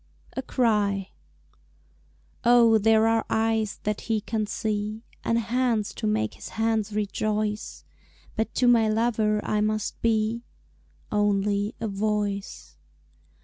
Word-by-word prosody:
A 265 - -1
Cry 210 -7 0 1.3
Oh, 235 -2 +6
there 220 +1 +4
are 225 0 +2
eyes 220 -2 0
that 210 0 -2
he 225 -1 0
can 215 0 -2
see, 215 +1 -3 0.2
And 230 - +1
hands 235 -2 0
to - - -3
make 110 0 0
his - - -10
hands 220 -1 0
rejoice, 210 0 -2 0.5
But 220 - -2
to 250 - +3
my 230 -2 +5
lover 215 -1 +1
I 210 - +1
must 215 0 -1
be 225 0 +1 0.7
Only 205 0 +1
a 225 - -2
voice. 205 0 -3
215 Hz, 120 wpm, -26 LUFS, 210-225 Hz, 1.3 s, Oh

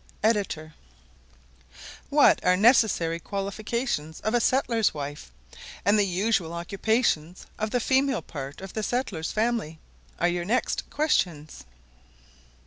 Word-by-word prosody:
Ed.] 200 -8 0 1.4
"What 290 0 +5
are 180 0 +4
necessary 200 -7 +3
qualifications 200 - -3
of 215 +3 -1
a 240 - +4
settler's 230 -5 +2
wife; 145 0 -6 0.5
and 205 +2 +4
the 205 - +4
usual 185 -2 0
occupations 180 -1 -1
of 215 0 -1
the 245 - 0
female 265 +1 +1
part 140 0 -7
of 195 -1 -9
a 220 - -1
settler's 210 -8 -2
family?" 220 -8 -1 0.4
are 175 - +2
your 175 0 -1
next 230 +7 -1
questions. 175 - -1
200 Hz, 120 wpm, -26 LUFS, 165-230 Hz, 1.4 s, What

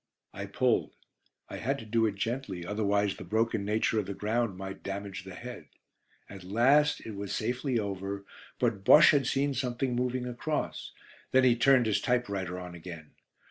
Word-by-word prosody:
I 100 - -6
pulled. 125 +4 +1 0.5
I - - -7
had 135 +4 -1
to 115 - -9
do 115 +1 +2
it 105 - -3
gently, 100 -4 -3
otherwise 100 0 0
the - - -9
broken 110 -1 0
nature 110 +2 +1
of 100 - -3
the 100 - -4
ground 110 -1 -1
might 95 0 -7
damage 100 -2 -5
the 95 -1 -9
head. 120 -11 -9 0.6
At 100 -2 -10
last 135 +10 +3
it 110 - -5
was 100 -1 -4
safely 125 +3 -1
over, 100 -1 -4 0.3
but 115 -6 0
Bosche 150 +9 +8
had 140 -4 +2
seen 140 +1 +1
something 125 -1 -1
moving 125 0 -1
across; 125 +5 -3 0.4
then 130 0 +4
he 125 -2 +5
turned 125 0 +5
his 110 -2 +1
typewriter 100 - -1
on 90 -1 -8
again. 85 -3 -9
110 Hz, 175 wpm, -29 LUFS, 100-125 Hz, 0.6 s, Bosche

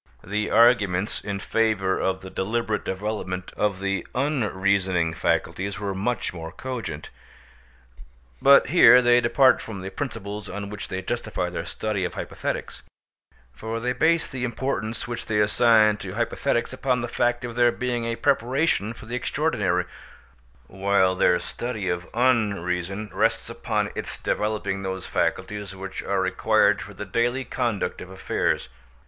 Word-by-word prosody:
The 105 +2 -2
arguments 105 -5 +3
in 100 -1 -3
favour 105 -4 +1
of 95 0 -1
the 95 0 -9
deliberate 110 +2 -1
development 95 -2 -4
of 100 -3 0
the 100 0 -2
unreasoning 100 - +1
faculties 95 +4 -1
were 100 -2 -2
much 105 +4 -2
more 80 -2 -7
cogent. 120 - -6 1.3
But 140 0 +6
here 125 -7 +8
they 120 0 +5
depart 130 +2 +4
from 100 -4 -7
the 95 +1 -6
principles 105 -4 -5
on 100 +1 -5
which 105 - -6
they 95 0 -4
justify - - -3
their - - -4
study 105 -3 -2
of 90 - -3
hypothetics; - - -4 0.7
for 110 - -4
they 125 +2 -1
base 160 +6 +2
the 130 -2 -6
importance 120 -2 -2
which 120 -1 -5
they 105 -2 +1
assign 110 0 +4
to 95 -3 -7
hypothetics 120 +2 -1
upon 130 -1 0
the 120 - -2
fact 120 +1 0
of 120 -1 -6
their 120 0 +4
being 120 -1 -2
a 115 0 -1
preparation 130 -3 +1
for 115 - -12
the 120 +2 -4
extraordinary, 125 - 0 0.8
while 95 -1 +2
their 90 -1 +3
study 105 +2 -4
of 90 0 -3
Unreason 100 -5 0
rests - - +1
upon - - -2
its - - -5
developing 105 -2 -1
those 95 -1 -4
faculties 100 -2 -2
which 95 0 -6
are 100 -1 0
required 95 0 +3
for - - -9
the 105 - -6
daily 120 +6 0
conduct 105 -7 -2
of 90 - -9
affairs. 95 0 -1
105 Hz, 150 wpm, -25 LUFS, 95-120 Hz, 1.3 s, here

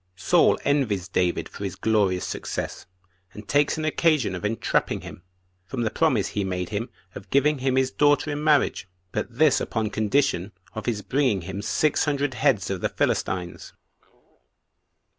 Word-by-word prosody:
Saul - - +3
Envies 115 -11 +1
David 90 -2 0
For - - -9
His - - -3
Glorious 100 -5 +1
Success, - - -5 0.5
And 105 - -11
Takes 145 +2 +2
An 155 - -2
Occasion 155 - +2
Of 90 - -6
Entrapping 110 +2 0
Him, - - -10 0.5
From 125 +1 -3
The 110 - 0
Promise 130 -12 +1
He 105 - -2
Made 90 -2 -3
Him 110 +4 -3 0.2
Of 100 - -10
Giving 145 +1 +2
Him 130 0 0
His 130 0 +2
Daughter 145 +1 +2
In 145 +1 -3
Marriage; 150 -10 +2 0.2
But 115 +4 -4
This 155 -2 +4
Upon 110 -2 -2
Condition 105 -4 0 0.2
Of 110 -2 -6
His 105 -4 -1
Bringing 130 -8 +1
Him 95 +3 -5
Six 155 +8 +1
Hundred 145 -2 0
Heads 110 -5 +1
Of 95 -2 -3
The - - 0
Philistines. 90 -2 -2
115 Hz, 160 wpm, -25 LUFS, 100-145 Hz, 0.5 s, This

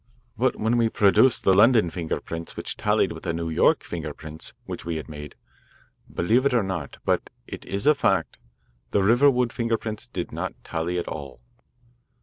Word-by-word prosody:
But - - +1
when 115 +2 +1
we 115 -1 +3
produced 110 +5 +4
the 95 - +5
London 110 -3 +5
finger 80 -2 -3
prints 85 0 -7
which - - -4
tallied - - +1
with - - -8
the 85 - -2
New 85 -1 -3
York 80 - +3
finger 80 -4 -5
prints 80 0 -8
which - - -6
we 85 0 -3
had 80 - -5
made 75 -2 -9 0.8
believe 115 +9 +2
it 140 -2 +2
or 115 - +3
not, 95 -7 -4
but - - 0 0.2
it - - -8
is 100 +1 -3
a 150 - +7
fact, 140 - 0 0.5
the 100 - +2
Riverwood 125 +2 +4
finger 115 -2 0
prints 110 +1 -5
did 90 -7 -5
not - - -4
tally 85 +2 -2
at 85 - -3
all." 70 -5 -7
95 Hz, 185 wpm, -25 LUFS, 80-115 Hz, 0.8 s, a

